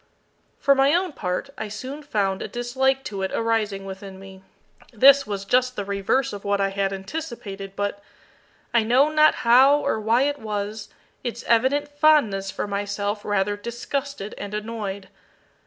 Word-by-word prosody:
For 280 - +4
my 275 +3 +4
own 365 0 0
part, 180 +8 -3
I 220 - -3
soon 260 +8 -7
found 200 -9 -1
a - - -3
dislike 265 +2 0
to 200 -5 -5
it 190 - -2
arising 215 -4 -1
within 195 0 -8
me. 190 -1 -12 0.5
This 275 +3 +6
was 200 -1 -4
just 250 +3 +2
the 205 - -4
reverse 200 +6 0
of 200 - -7
what 200 0 0
I 195 0 +1
had 195 0 -1
anticipated, 195 -2 -6
but 205 0 -3 0.7
I 235 - +5
know 250 +7 +4
not 310 0 +5
how 260 +5 +7
or 220 - -1
why 225 +4 +2
it 285 0 -1
was 210 0 -4 0.3
its 240 -2 -4
evident 260 +5 +2
fondness 290 -10 +3
for - - -3
myself 205 +1 -3
rather 205 0 0
disgusted 235 +2 -5
and 205 +1 -5
annoyed. 210 -3 -5
215 Hz, 160 wpm, -23 LUFS, 200-265 Hz, 0.7 s, how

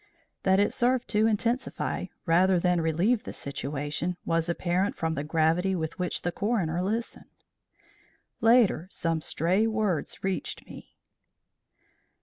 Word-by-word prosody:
That 190 0 +3
it 205 - +2
served 250 +1 +1
to 215 +1 +3
intensify 230 +4 -1 0.2
rather 180 +2 +4
than 180 -1 +2
relieve 175 +9 +1
the - - -7
situation 145 +5 -4
was 165 0 0
apparent 180 +3 0
from 160 -1 -1
the 145 - -3
gravity 165 +4 +1
with 160 +1 -4
which 180 -1 -2
the 175 - 0
coroner 180 -5 -1
listened. 220 +5 -3 1.1
Later, 225 -7 +4
some 165 -4 -1
stray 185 +8 +1
words 215 -7 -1
reached 190 -1 -3
me. - - -13
180 Hz, 130 wpm, -27 LUFS, 165-210 Hz, 1.1 s, rather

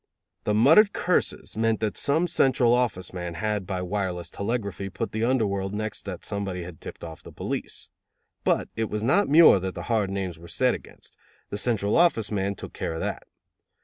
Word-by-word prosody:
The 105 - +1
muttered 160 - +6
curses 180 - -1
meant 110 0 +1
that 110 -2 -1
some 160 +5 +2
Central 130 -6 +3
Office 120 -8 0
man 90 -2 -5
had 105 +1 -2
by 95 -2 -2
wireless 90 -3 -3
telegraphy 100 -3 -3
put 100 +4 -4
the 110 +1 -2
under 125 -1 +2
world 100 0 -2
next 110 0 -4
that 95 -3 -6
somebody 100 -3 -3
had 85 -3 -10
tipped - - -9
off 80 -1 -8
the - - -12
police. - - -5 0.5
But - - +1
it 110 -1 -1
was 105 0 -3
not 140 - +3
Muir 155 - +8
that 95 0 -4
the - - -5
hard 105 -4 +1
names 95 -4 -4
were 85 - -12
said - - +2
against: - - -10 0.3
the 100 - -2
Central 105 -4 +1
Office 140 -12 +3
man 100 -1 -1
took - - -9
care 80 - -3
of - - -4
that. - - -4
105 Hz, 195 wpm, -26 LUFS, 95-115 Hz, 0.5 s, Muir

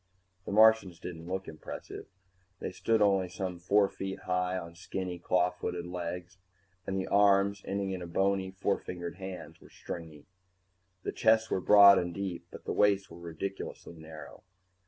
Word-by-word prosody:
The - - -3
Martians 110 -4 +5
didn't 85 -2 -8
look 95 +1 -3
impressive. 80 - -8 0.5
They - - -5
stood 110 +3 +1
only 95 -3 +2
some 90 -1 -5
four 100 +3 +3
feet 95 0 -6
high 90 0 -1
on 85 -2 -7
skinny, 90 0 -5
claw 90 +1 +2
footed 90 -1 -4
legs, 90 +1 -6 0.5
and 95 - -1
the 95 - -2
arms, 100 0 +3
ending 100 0 -2
in 90 -2 -4
bony 95 +2 +1
four 95 +1 -1
fingered 85 -1 -6
hands, 90 -4 -8
were - - -16
stringy. 80 -4 -8 0.8
The - - -2
chests 110 0 +3
were 95 - 0
broad 100 0 +8
and 85 -1 -3
deep, 95 -3 -4
but - - -12
the - - -2
waists 100 -1 +2
were 85 - -11
ridiculously 85 +2 -6
narrow. 80 -1 -11
95 Hz, 160 wpm, -30 LUFS, 85-100 Hz, 0.8 s, broad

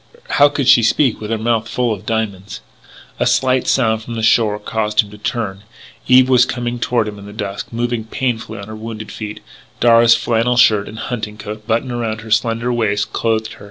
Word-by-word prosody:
How 145 - +8
could 145 -3 -2
she 135 -3 +7
speak 115 +2 +2
with 105 - -5
her 115 - 0
mouth 115 0 -1
full 120 +1 0
of 100 - -10
diamonds? 100 - -3 0.6
A - - +2
slight 130 +1 +2
sound 110 -4 +2
from 115 +1 -7
the 115 - -3
shore 110 -2 +3
caused 105 0 0
him 105 -2 -12
to 105 - -11
turn. 105 -4 -3 0.5
Eve 130 0 +6
was 125 -2 +5
coming 120 -1 -3
toward 120 -2 0
him 105 -1 -7
in 100 - -11
the - - -9
dusk, 100 -1 -5
moving 120 -1 -2
painfully 120 0 -3
on 100 - -8
her 110 - -8
wounded 110 0 -7
feet. 105 -1 -7 0.4
Darragh's 115 0 +6
flannel 120 +1 0
shirt 105 -4 +4
and 110 - -9
his 110 - -5
hunting 110 -3 -4
coat 105 0 -8
buttoned 115 +2 0
around 115 -2 -3
her 110 -1 -11
slender 115 +2 +1
waist 110 -4 -1
clothed 110 -1 -1
her. - - -16
115 Hz, 210 wpm, -17 LUFS, 105-120 Hz, 0.6 s, How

